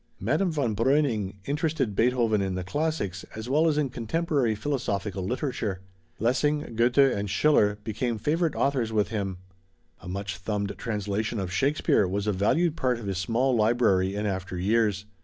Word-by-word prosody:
Madame 155 - +1
von 135 -9 -1
Breuning 115 -5 +1
interested 145 - -1
Beethoven 115 -3 +2
in 95 -1 -1
the 95 - -3
classics, 100 - -2
as 110 +1 -6
well 150 +5 +3
as 155 -2 +2
in 145 -4 0
contemporary 130 0 0
philosophical 105 -6 -2
literature. 110 -4 -2 0.4
Lessing, 130 +3 0
Goethe 120 +3 +2 0.2
and 100 0 -3
Schiller 105 -2 +3
became 115 +2 -2
favorite 160 +7 0
authors 130 -5 0
with 105 -2 +1
him. 100 -4 -3 0.6
A - - -12
much 100 +1 -4
thumbed 100 +1 -2
translation 105 +1 -2
of 90 -2 -4
Shakespeare 135 -7 +2
was 100 +2 -2
a 105 - +1
valued 155 - +2
part 125 -5 0
of 115 - -8
his 95 -2 -2
small 120 +6 +1
library 105 -4 +2
in 105 +1 -2
after 95 -2 -3
years. 105 +1 +1
110 Hz, 160 wpm, -27 LUFS, 100-135 Hz, 0.6 s, well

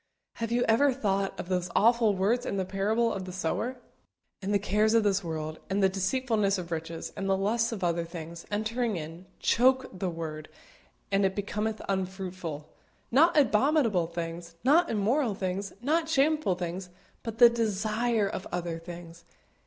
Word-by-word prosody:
Have 230 0 -3
you 245 +1 +2
ever 270 +6 +4
thought 200 -6 -1
of - - -5
those 180 -1 -1
awful 230 -2 +4
words 215 +6 +1
in 200 - -3
the 190 - 0
parable 215 +5 +1
of 190 -1 -4
the 185 - -7
sower? 190 +8 -2 0.6
"And 195 +1 -2
the 205 - +4
cares 210 +2 +2
of 225 - +5
this 200 -1 +1
world, 155 -1 -4
and 195 +1 +1
the 190 - +5
deceitfulness 200 +1 +1
of 175 -2 -6
riches, 165 0 -5
and 195 0 -3
the 190 - +3
lusts 225 +5 +1
of 205 -5 -5
other 170 -1 +1
things, 170 0 -8
entering 220 +2 -1
in, 165 +3 -8
choke 260 +2 +3
the 185 - -1
word, 155 -2 -6 0.6
and 195 0 +3
it 190 0 +1
becometh 210 +2 -2
unfruitful," 185 -5 -4 0.4
not 315 +7 +5
abominable 240 - +3
things, 170 0 -6
not 320 +7 +4
immoral 225 +2 +1
things, 190 +1 -3
not 320 +4 +1
shameful 300 - +2
things, 180 +1 -5 0.3
but 225 -2 -6
the 240 0 +10
desire 220 0 0
of 190 -1 -5
other 170 -2 -3
things. 170 0 -10
195 Hz, 170 wpm, -28 LUFS, 175-230 Hz, 0.6 s, the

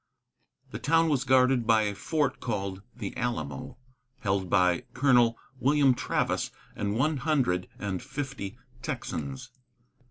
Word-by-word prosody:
The - - -5
town 165 +1 +3
was 135 -3 +1
guarded 130 -2 +4
by 110 -1 +5
a 105 -1 -1
fort 145 +5 -1
called 100 -5 -3
the 105 -5 -5
Alamo, 75 - -3 0.4
held 95 -3 0
by 90 -2 +3
Colonel 120 -4 +4 0.2
William 140 -1 +4
Travis - - 0 0.3
and 100 0 -1
one 150 +4 +2
hundred 130 - +1
and 95 -3 -3
fifty 135 -7 -5 0.2
Texans. 80 - -4
120 Hz, 125 wpm, -28 LUFS, 100-135 Hz, 0.4 s, by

